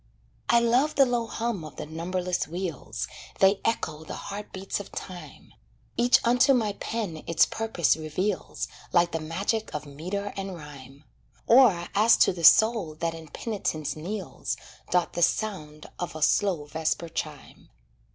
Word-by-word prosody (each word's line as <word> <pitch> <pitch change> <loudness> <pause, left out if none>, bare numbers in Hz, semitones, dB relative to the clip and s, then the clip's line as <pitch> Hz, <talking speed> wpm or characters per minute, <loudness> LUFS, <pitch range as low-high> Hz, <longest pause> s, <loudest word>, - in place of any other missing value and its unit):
I 235 - +6
love 245 +6 +2
the 275 - +6
low 240 -2 0
hum 230 -6 -3
of 155 - -9
the - - -6
numberless 175 +3 -2
wheels 170 -2 -4 0.3
They 195 +1 +4
echo 160 -9 -1
the - - -7
heart 205 +1 -7
beats 195 +1 -4
of 200 - -9
time, 180 -2 -9 0.4
Each 240 +1 +5
unto 245 +3 +5
my 215 -4 +1
pen 200 -8 -4
its 165 -1 +5
purpose 220 -10 +1
reveals, 160 +6 -3 0.2
Like 175 -1 +3
the 165 - -2
magic 195 +8 -2
of 150 - -4
meter 180 +8 -5
and 195 -1 -4
rhyme; 140 -3 -12 0.4
Or, 225 -9 +5
as 215 +3 +5
to - - +4
the 170 -2 -7
soul 215 -4 +6
that 165 +1 -2
in 165 -1 -10
penitence 155 -5 -3
kneels, 190 +6 -4 0.3
Doth 180 -1 +2
the 175 - -3
sound 160 -6 -1
of 175 -3 -4
a 155 - -2
slow 180 -6 +2
vesper 160 +2 -2
chime. 155 -3 -7
180 Hz, 155 wpm, -27 LUFS, 160-215 Hz, 0.4 s, I